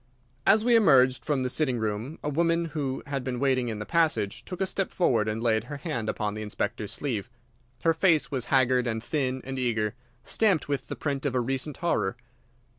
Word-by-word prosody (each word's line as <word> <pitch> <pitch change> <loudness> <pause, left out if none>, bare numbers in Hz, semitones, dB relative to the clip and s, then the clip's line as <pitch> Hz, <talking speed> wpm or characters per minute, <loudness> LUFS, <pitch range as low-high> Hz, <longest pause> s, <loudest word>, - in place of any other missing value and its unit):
As 215 +3 +5
we 240 -1 +5
emerged 130 - +5
from 145 -4 0
the - - 0
sitting 130 -2 +1
room 110 +7 -3
a 150 - -1
woman, 165 +3 +1
who 135 -4 -2
had 140 -2 -3
been 125 -1 -3
waiting 130 -2 +2
in 110 -2 -3
the 105 - -5
passage, 160 -11 +1
took 180 - -7
a 190 - +2
step 190 0 -1
forward 115 - +2
and 110 +1 -2
laid 110 -2 +2
her 145 - -6
hand 115 -5 -3
upon 105 -1 -2
the 110 - -5
Inspector's 105 0 -3
sleeve. 120 -6 -3 0.5
Her 165 - +4
face 165 -3 +3
was 130 -4 -2
haggard 130 -2 +3
and 110 -1 -2
thin 130 -1 -1
and 135 0 -4
eager, 110 -4 0 0.3
stamped 200 +1 +1
with 140 -2 -2
the - - -5
print 140 -2 -3
of 130 - -2
a - - +3
recent 135 +4 -2
horror. 105 - +1
130 Hz, 205 wpm, -27 LUFS, 115-155 Hz, 0.5 s, As